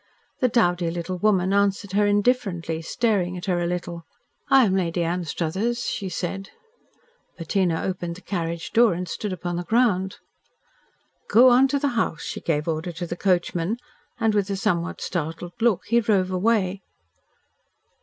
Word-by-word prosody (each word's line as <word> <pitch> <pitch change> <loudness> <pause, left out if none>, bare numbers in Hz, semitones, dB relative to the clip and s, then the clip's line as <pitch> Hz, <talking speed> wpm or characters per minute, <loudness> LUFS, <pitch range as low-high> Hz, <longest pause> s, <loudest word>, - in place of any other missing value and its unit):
The 255 - +3
dowdy 175 -7 +2
little 175 +2 -4
woman 190 -2 +2
answered 200 -1 +1
her 205 +1 +3
indifferently, 205 -7 0
staring 185 -2 0
at 175 - -6
her 180 -3 0
a 170 - 0
little. 175 -1 -4 0.5
"I 265 -2 +6
am 190 -2 +1
Lady 175 -2 0
Anstruthers," 180 +7 -2
she 195 -3 -3
said. 190 +2 -4 0.9
Bettina 170 0 0
opened 175 -2 -3
the 185 - -12
carriage 170 -4 -4
door 230 -5 +5
and 180 +1 -4
stood 210 +2 -4
upon 175 -1 -3
the 175 - -3
ground. 200 -3 +1 1.1
"Go 250 +4 +7
on 255 +2 +6
to 280 +1 0
the 285 0 0
house," 230 - -1
she - - -5
gave 150 -2 -1
order 165 +2 -2
to 170 +1 -5
the 175 - -4
coachman, 180 +2 0 0.4
and, 225 -2 +2
with 205 -2 +1
a 200 - -1
somewhat 185 -4 -1
startled 165 0 -4
look, 225 -5 +2
he 235 +2 +3
drove 200 -4 +1
away. 195 0 +1
185 Hz, 160 wpm, -24 LUFS, 175-210 Hz, 1.1 s, Go